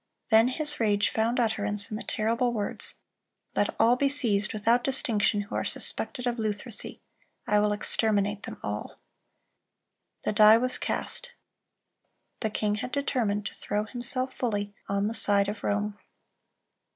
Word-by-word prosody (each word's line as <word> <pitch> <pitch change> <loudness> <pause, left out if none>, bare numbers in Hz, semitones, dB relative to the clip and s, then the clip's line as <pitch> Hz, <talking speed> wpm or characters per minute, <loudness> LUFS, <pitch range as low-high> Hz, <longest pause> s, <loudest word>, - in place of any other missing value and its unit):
Then 220 +2 +7
his 295 +3 -2
rage 205 -2 +2
found 230 +3 +1
utterance 210 -3 -1
in - - -2
the 215 - -5
terrible 230 +3 0
words: 210 -3 -2 0.6
"Let - - 0
all 235 +2 +5
be 275 +2 +2
seized 220 -8 +1
without 230 +3 +2
distinction 220 -6 +1
who 205 - -9
are - - 0
suspected 250 - -2
of 240 -1 -1
Lutheresy. 215 +1 -3 0.4
I 210 - +3
will 210 0 +2
exterminate 205 -1 +1
them - - -8
all."(336) 105 0 -11
The - - 0
die 215 +1 +8
was 255 +2 0
cast. - - -4 1.1
The 220 - -1
king 210 0 0
had 250 - -5
determined 235 -7 0
to - - -4
throw 210 +1 -2
himself 255 +2 -1
fully 205 -4 -2 0.2
on 200 +1 +1
the 220 - -2
side 205 -3 +3
of 205 0 -5
Rome. 205 0 -1
215 Hz, 150 wpm, -28 LUFS, 205-245 Hz, 1.1 s, die